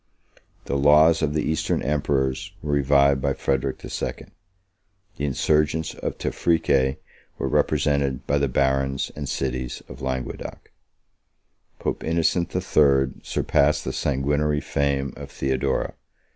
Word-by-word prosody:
The 70 Hz, -, -1 dB
laws 75 Hz, +3 st, +5 dB
of 75 Hz, -1 st, 0 dB
the 75 Hz, -, +1 dB
Eastern 80 Hz, 0 st, 0 dB
emperors 70 Hz, -2 st, -1 dB
were 75 Hz, -1 st, -1 dB
revived 70 Hz, -1 st, +4 dB
by 70 Hz, +1 st, +1 dB
Frederic 65 Hz, 0 st, -1 dB
the -, -, -10 dB
Second. -, -, -5 dB, 0.9 s
The 70 Hz, -, -2 dB
insurgents 75 Hz, +3 st, +1 dB
of -, -, -5 dB
Tephrice 70 Hz, -5 st, +1 dB, 0.4 s
were -, -, -2 dB
represented 70 Hz, -3 st, +1 dB
by 70 Hz, -, +1 dB
the 70 Hz, -, +1 dB
barons 65 Hz, +1 st, 0 dB
and 70 Hz, -2 st, -5 dB
cities 65 Hz, -2 st, -3 dB
of 65 Hz, +3 st, -11 dB
Languedoc: 65 Hz, -1 st, -5 dB, 1.1 s
Pope -, -, -3 dB
Innocent 85 Hz, +2 st, 0 dB
III. 70 Hz, -7 st, +2 dB
surpassed 75 Hz, +2 st, +1 dB
the -, -, -3 dB
sanguinary 75 Hz, +2 st, 0 dB
fame 70 Hz, -1 st, -1 dB
of -, -, -9 dB
Theodora. 65 Hz, 0 st, -1 dB
70 Hz, 125 wpm, -24 LUFS, 65-75 Hz, 1.1 s, laws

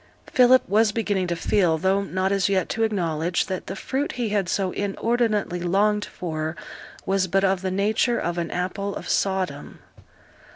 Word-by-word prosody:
Philip 255 Hz, 0 st, +5 dB
was 215 Hz, +2 st, +3 dB
beginning 205 Hz, -4 st, -1 dB
to 170 Hz, -, -1 dB
feel, 170 Hz, -2 st, +2 dB
though 190 Hz, +4 st, +1 dB
not 190 Hz, -1 st, -1 dB
as 195 Hz, -1 st, +1 dB
yet 190 Hz, -2 st, +1 dB
to 225 Hz, -, -2 dB
acknowledge, 175 Hz, -6 st, 0 dB
that 190 Hz, -2 st, -5 dB
the -, -, -4 dB
fruit 275 Hz, +3 st, -2 dB
he 240 Hz, -3 st, -2 dB
had 200 Hz, -3 st, 0 dB
so 190 Hz, -2 st, 0 dB
inordinately 210 Hz, -2 st, -1 dB
longed 205 Hz, +4 st, +1 dB
for 160 Hz, -2 st, -4 dB, 0.5 s
was 195 Hz, -1 st, +1 dB
but 195 Hz, +2 st, +1 dB
of 190 Hz, -1 st, +2 dB
the 190 Hz, -, -2 dB
nature 215 Hz, +5 st, +1 dB
of 175 Hz, +1 st, -2 dB
an 170 Hz, -1 st, -2 dB
apple 195 Hz, +3 st, -3 dB
of -, -, -7 dB
Sodom. 185 Hz, -7 st, -1 dB
195 Hz, 170 wpm, -24 LUFS, 180-210 Hz, 0.5 s, Philip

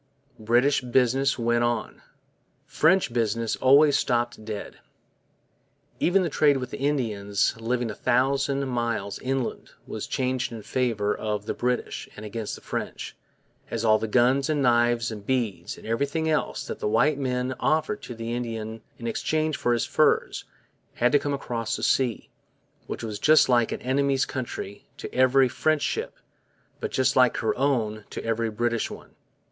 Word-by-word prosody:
British 120 Hz, +6 st, +3 dB
business 130 Hz, +2 st, +2 dB
went 120 Hz, 0 st, +1 dB
on. 120 Hz, -2 st, -2 dB, 0.6 s
French 165 Hz, -5 st, +2 dB
business 115 Hz, -1 st, 0 dB
almost 140 Hz, +2 st, +5 dB
stopped 120 Hz, -3 st, -1 dB
dead. 105 Hz, -2 st, -7 dB, 1.2 s
Even 190 Hz, +2 st, +3 dB
the -, -, 0 dB
trade 145 Hz, -1 st, +3 dB
with 125 Hz, -1 st, -5 dB
the -, -, -6 dB
Indians 110 Hz, -8 st, 0 dB
living 120 Hz, 0 st, -1 dB
a -, -, -6 dB
thousand 135 Hz, +4 st, +1 dB
miles 115 Hz, -5 st, -2 dB
inland 130 Hz, -1 st, -3 dB, 0.2 s
was -, -, -6 dB
changed 130 Hz, -1 st, -1 dB
in 115 Hz, -2 st, -8 dB
favour 110 Hz, -5 st, 0 dB
of 105 Hz, -1 st, -3 dB
the -, -, -2 dB
British 125 Hz, 0 st, -2 dB
and 105 Hz, -, -9 dB
against 105 Hz, 0 st, -4 dB
the -, -, -13 dB
French, -, -, -5 dB, 0.5 s
as 115 Hz, 0 st, -2 dB
all 110 Hz, -1 st, +5 dB
the 110 Hz, -, -2 dB
guns 130 Hz, +5 st, +3 dB
and 150 Hz, -2 st, +1 dB
knives 120 Hz, -1 st, +2 dB
and 105 Hz, -1 st, -8 dB
beads 110 Hz, -8 st, -2 dB
and -, -, -13 dB
everything 140 Hz, +8 st, -1 dB
else 155 Hz, -1 st, -1 dB
that -, -, -6 dB
the -, -, -1 dB
white 135 Hz, +7 st, +2 dB
man 125 Hz, -1 st, -1 dB
offered 160 Hz, +7 st, 0 dB
to 120 Hz, -, -8 dB
the 115 Hz, +1 st, -4 dB
Indian 115 Hz, -2 st, -4 dB, 0.2 s
in 115 Hz, -, -9 dB
exchange 155 Hz, +6 st, 0 dB
for 120 Hz, -, 0 dB
his 120 Hz, -1 st, +1 dB
furs -, -, +1 dB, 0.5 s
had 125 Hz, +1 st, +2 dB
to 145 Hz, -, +5 dB
come 145 Hz, 0 st, -2 dB
across 115 Hz, -4 st, -3 dB
the 110 Hz, -, -6 dB
sea, 125 Hz, -1 st, +1 dB, 0.6 s
which -, -, -5 dB
was 105 Hz, -2 st, -4 dB
just 155 Hz, +6 st, +5 dB
like 120 Hz, -2 st, +3 dB
an -, -, -5 dB
enemy's 135 Hz, +1 st, +1 dB
country 120 Hz, -6 st, -6 dB
to -, -, -8 dB
every 130 Hz, +1 st, +4 dB
French 155 Hz, +4 st, 0 dB
ship, -, -, -2 dB, 0.6 s
but -, -, -3 dB
just 130 Hz, 0 st, +1 dB
like 125 Hz, -1 st, +4 dB
her 110 Hz, -, 0 dB
own 115 Hz, -6 st, 0 dB
to -, -, -6 dB
every 115 Hz, 0 st, 0 dB
British 115 Hz, +1 st, -1 dB
one. -, -, -11 dB
120 Hz, 165 wpm, -25 LUFS, 115-135 Hz, 1.2 s, almost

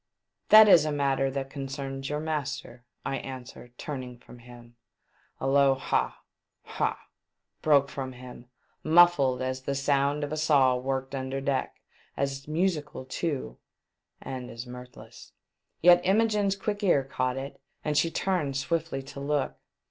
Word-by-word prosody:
'• -, -, -45 dB
That 215 Hz, 0 st, +10 dB
is 175 Hz, -6 st, +7 dB
a 155 Hz, -, -1 dB
matter 135 Hz, -2 st, +1 dB
that 135 Hz, 0 st, -4 dB
concerns 135 Hz, -1 st, -5 dB
your 150 Hz, 0 st, -2 dB
master," 145 Hz, -5 st, -4 dB, 0.2 s
I 135 Hz, -, -1 dB
answered, 125 Hz, -2 st, -9 dB
turning 130 Hz, -4 st, -6 dB
from 120 Hz, 0 st, -15 dB
him. 120 Hz, 0 st, -15 dB, 0.6 s
A -, -, -4 dB
low 135 Hz, 0 st, +4 dB
ha! 135 Hz, -, -1 dB, 0.4 s
ha! -, -, -2 dB, 0.6 s
broke 140 Hz, -3 st, +4 dB
from 130 Hz, -2 st, -6 dB
him, 125 Hz, -1 st, -11 dB, 0.4 s
muffled 155 Hz, -6 st, +5 dB
as 130 Hz, 0 st, -3 dB
the 140 Hz, +1 st, -3 dB
sound 140 Hz, +1 st, +1 dB
of 145 Hz, -, -4 dB
a 155 Hz, -, -2 dB
saw 140 Hz, -4 st, +4 dB
worked 135 Hz, +1 st, -3 dB
under 135 Hz, 0 st, -3 dB
deck, 135 Hz, -1 st, -2 dB, 0.4 s
as 140 Hz, 0 st, -2 dB
musical 155 Hz, -4 st, -1 dB
too, 145 Hz, +1 st, -4 dB, 0.6 s
and 130 Hz, -2 st, -6 dB
as 115 Hz, +2 st, -7 dB
mirthless. 125 Hz, 0 st, -12 dB, 0.5 s
Yet 175 Hz, 0 st, +8 dB
Imogene's 205 Hz, 0 st, +2 dB
quick 205 Hz, +1 st, -3 dB
ear 175 Hz, -9 st, +3 dB
caught 130 Hz, -1 st, -2 dB
it, 135 Hz, +1 st, -7 dB, 0.2 s
and 150 Hz, -, 0 dB
she 165 Hz, -, +3 dB
turned 165 Hz, -7 st, -1 dB
swiftly 160 Hz, -1 st, -2 dB
to 135 Hz, -, -10 dB
look. 145 Hz, 0 st, -1 dB
135 Hz, 150 wpm, -27 LUFS, 130-155 Hz, 0.6 s, That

